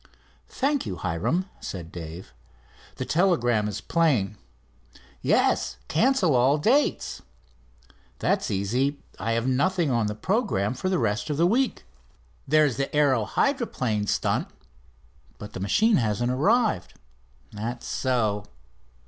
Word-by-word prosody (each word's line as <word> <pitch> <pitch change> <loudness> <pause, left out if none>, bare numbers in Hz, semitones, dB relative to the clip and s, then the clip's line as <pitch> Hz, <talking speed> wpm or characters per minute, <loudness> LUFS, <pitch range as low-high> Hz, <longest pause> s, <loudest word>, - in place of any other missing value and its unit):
"Thank 280 0 0
you 95 - -3
Hiram," 90 - -1
said 85 -3 -7
Dave. 85 +1 -8 0.6
"The - - -4
telegram 120 - +2
is 105 -1 -4
plain." 130 - +1 0.9
"Yes, - - +2
cancel 200 - +3
all 130 +4 +4
dates." 255 - +1 1.0
"That's - - 0
easy, 125 +9 0 0.2
I 115 - -1
have 115 +1 0
nothing 155 +4 +1
on 115 -3 +1
the 105 - -3
programme 125 - 0
for 160 +9 -3
the 185 - +1
rest 110 +4 -1
of 145 - -1
the 170 - +4
week." 245 +8 +1 0.6
"There's 150 -3 +3
the 135 0 -2
aero 135 -7 +3
hydroplane 125 - 0
stunt." - - 0 0.9
"But 105 - -9
the - - -6
machine 210 - +3
hasn't 120 +1 0
arrived." 200 - +1 0.6
"That's 115 +3 -5
so." 110 -6 0
130 Hz, 125 wpm, -25 LUFS, 105-175 Hz, 1.0 s, all